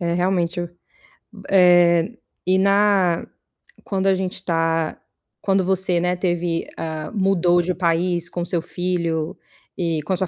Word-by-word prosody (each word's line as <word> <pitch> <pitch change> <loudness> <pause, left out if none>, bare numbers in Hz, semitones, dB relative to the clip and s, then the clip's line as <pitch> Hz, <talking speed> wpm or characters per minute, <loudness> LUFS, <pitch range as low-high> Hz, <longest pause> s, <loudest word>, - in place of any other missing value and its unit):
É, 170 -1 -1
realmente 180 -1 0
eu 175 - -4 0.8
eh, 175 +2 +4 0.3
e 185 +1 +4
na 195 -3 +2 0.6
quando 195 -1 -1
a 195 - +5
gente 185 0 -3
tá 165 -2 -1 0.4
quando 195 -1 +1
você, 185 -1 +1
né, 180 +1 +1
teve, 175 -2 -1
ah, 160 -1 -4
mudou 180 -3 +3
de 180 +1 -2
país 175 0 0
com 175 - -4
seu 175 -1 -1
filho 170 -2 -2 0.4
e 165 -3 -1
com 150 - -5
a - - 0
sua 190 - -1
175 Hz, 145 wpm, -21 LUFS, 170-190 Hz, 0.8 s, a